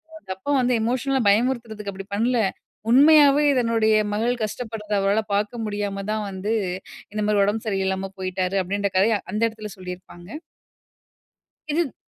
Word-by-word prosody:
அவுங்க 245 -12 -7
அப்பா 285 +9 -4
வந்து 250 0 +2
எமோஷனலா 260 +3 0
பயமுறுத்துறதுக்கு 220 -2 0
அப்பிடி 195 0 -9
பண்ல. 240 +4 +1 0.5
உண்மையாவே 290 +2 +7 0.2
தன்னுடைய 225 -2 +2 0.2
மகள் 230 +4 +1
கஷ்டப்படுறத 215 -1 -5
அவரால 200 +2 +2
பார்க்க 210 +3 -1
முடியாம 205 -1 -3
தான் 215 -1 -2
வந்து, 195 +3 -3 0.6
இந்த 215 - -2
மாரி 210 -1 +3
உடம்பு 215 +3 -2
சரியில்லாம 190 -1 -1
போயிட்டாரு, 185 0 -2
அப்பிடீன்ற 200 +2 -2
கதைய 210 +2 +3
அந்த 215 - -1
இடத்தில 215 -1 -9
சொல்லியிருப்பாங்க. 180 0 -10 1.4
இதுத் 315 -3 0
210 Hz, 135 wpm, -23 LUFS, 195-240 Hz, 1.4 s, உண்மையாவே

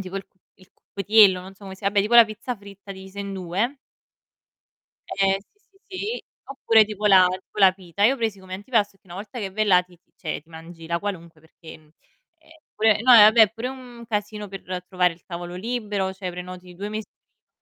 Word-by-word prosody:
tipo 190 0 -6
il 195 - -6
cu - - -46 0.2
il 185 0 -22
cuppietiello, 200 -2 +3
non 190 +1 -12
so 200 - -22
come 190 0 -9
si 195 - -15
vabbè 200 +1 +2
tipo 215 +4 0
la 235 -1 +10
pizza 220 +3 -6
fritta 200 0 -14
divisa 190 +1 -10
in 200 0 -5
2. 195 +8 -2 1.4
Eh, 195 0 +2
sì, 415 - -35 0.3
sì, 375 -2 -8
sì. 440 +5 -4 0.3
Oppure 225 -5 +4
tipo 210 0 -6
la 185 -2 +7
tipo 185 +3 -8
la 190 -2 +7
pita. 190 +1 -5
Io 260 +5 +5
presi 220 -4 -2
come 185 0 -10
antipasto 205 0 -1
che - - -57
una 175 - -10
volta 210 +6 -8
che 195 -3 -4
vai 215 +2 0
là 180 -3 +5
ti 180 -1 -22
ti - - -46
cioè 155 - -5
ti 160 - -30
mangi 165 0 -12
la 170 0 0
qualunque 170 -6 -6
perché, 160 0 -14
mhmm, 155 - -24 0.5
eh 320 0 -21
pure 215 0 +3
no 250 +1 +5
vabbè, 220 0 +8
è 215 - +6
pure 230 +2 -5
un 245 -3 -11
casino 210 -1 -3
per 195 0 -9 0.3
trovare 180 -2 +1
il 165 - -23
tavolo 175 0 -7
libero, 205 -2 -3
cioè 190 -1 -6
prenoti 180 0 -9
2 200 +3 -5
mesi 215 0 -5
prima - - -59
200 Hz, 220 wpm, -23 LUFS, 185-215 Hz, 1.4 s, la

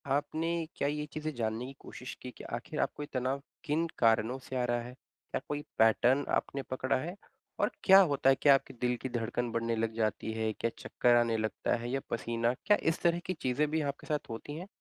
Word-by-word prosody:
आपने 160 +3 -1
क्या 140 - 0
ये 150 +1 -1
चीज़ें 155 0 -3
जानने 115 +1 -2
की 135 - -8
कोशिश 125 - -8
की 125 - -6
के - - -9
आखिर - - -6
आपको 150 - -1
ये - - -7
तनाव 130 +2 -1 0.2
किन 160 +2 +1
कारणों 115 +2 +3
से 130 0 -8
आ 125 - +1
रहा 120 0 0
है? 125 +1 -8
क्या - - -8
कोई 145 0 -2 0.2
पैटर्न 120 +5 +4
आपने 140 - -1
पकड़ा 130 0 +1
है? 170 +8 -4 0.4
और - - +2
क्या 195 0 +9
होता 135 -1 +3
है? 135 - +6
क्या 140 -2 +8
आपके 135 - -3
दिल 125 0 +2
की 130 - -3
धड़कन 120 0 -2
बढ़ने 115 0 0
लग 110 0 -1
जाती 110 0 -1
है? 110 0 0
क्या 115 - -1
चक्कर 120 -1 +3
आने 115 -1 +3
लगता 110 0 0
है, 120 +1 -5
या 135 - +1
पसीना? 115 +1 0
क्या 210 -1 +5
इस - - -6
तरह 170 0 +3
की 185 - -1
चीज़ें 145 -1 0
भी 160 0 +1
आपके 155 +2 -16
साथ 150 -5 -2
होती 130 +6 -6
हैं? 180 +4 -7
130 Hz, 225 wpm, -31 LUFS, 115-150 Hz, 0.4 s, क्या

